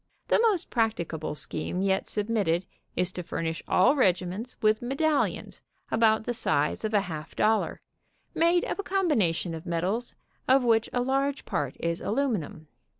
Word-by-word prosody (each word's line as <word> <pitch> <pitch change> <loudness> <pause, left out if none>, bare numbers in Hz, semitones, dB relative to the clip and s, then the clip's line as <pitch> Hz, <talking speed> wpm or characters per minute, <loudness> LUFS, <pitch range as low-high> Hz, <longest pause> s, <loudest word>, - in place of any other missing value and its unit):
The - - +4
most 430 -7 +1
practicable 170 - -1
scheme 180 +4 -3
yet 190 -1 +1
submitted 205 -5 0 0.3
is 180 +1 +1
to 180 - -5
furnish 165 -1 -3
all 190 +10 +4
regiments 190 0 0
with 215 0 +2
medallions 285 +5 0 0.3
about 220 -1 +3
the 245 - -2
size 150 -9 0
of 215 0 -1
a 205 - +5
half 160 -5 -7
dollar, 215 +1 +1 0.5
made 340 +2 +3
of - - -4
a - - -1
combination 225 - +1
of 165 +3 -7
metals 185 +8 -1 0.3
of 265 0 +5
which 225 -2 +3
a 245 - 0
large 275 +2 0
part 140 -2 -2
is 170 0 -2
alumi 245 -2 0
num. 155 0 -10
215 Hz, 155 wpm, -27 LUFS, 175-255 Hz, 0.5 s, a